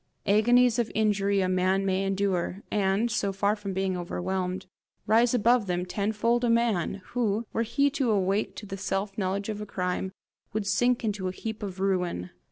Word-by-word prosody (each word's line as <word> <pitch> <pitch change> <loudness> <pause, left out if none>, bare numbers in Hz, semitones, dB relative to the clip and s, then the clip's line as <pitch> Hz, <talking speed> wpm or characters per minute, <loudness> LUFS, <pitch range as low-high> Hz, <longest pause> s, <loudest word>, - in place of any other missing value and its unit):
Agonies 240 +4 +4
of 230 -2 0
injury 200 -2 +2
a 185 - +1
man 185 +1 +1
may 190 0 +1
endure, 195 -1 -1
and, 205 +3 +1
so 200 -2 0
far 200 +2 +1
from 205 -2 -5
being 190 0 -1
overwhelmed, 180 +1 -3 0.4
rise 230 +3 +4
above 235 -1 +3
them 180 0 -1
tenfold 220 +5 0
a 240 - +2
man, 220 -5 +1
who, 230 -2 0
were - - 0
he 280 +5 +2
to 270 -4 0
awake 200 0 +1
to - - -8
the 195 -1 -6
self 195 +1 -2
knowledge 200 0 -2
of 210 -1 -4
a - - -4
crime, 180 0 -2 0.4
would 215 -1 -1
sink 245 +5 +2
into 205 -4 -1
a - - -1
heap 220 +3 -6
of 195 -2 -5
ruin. 180 - -1
200 Hz, 180 wpm, -27 LUFS, 190-220 Hz, 0.4 s, Agonies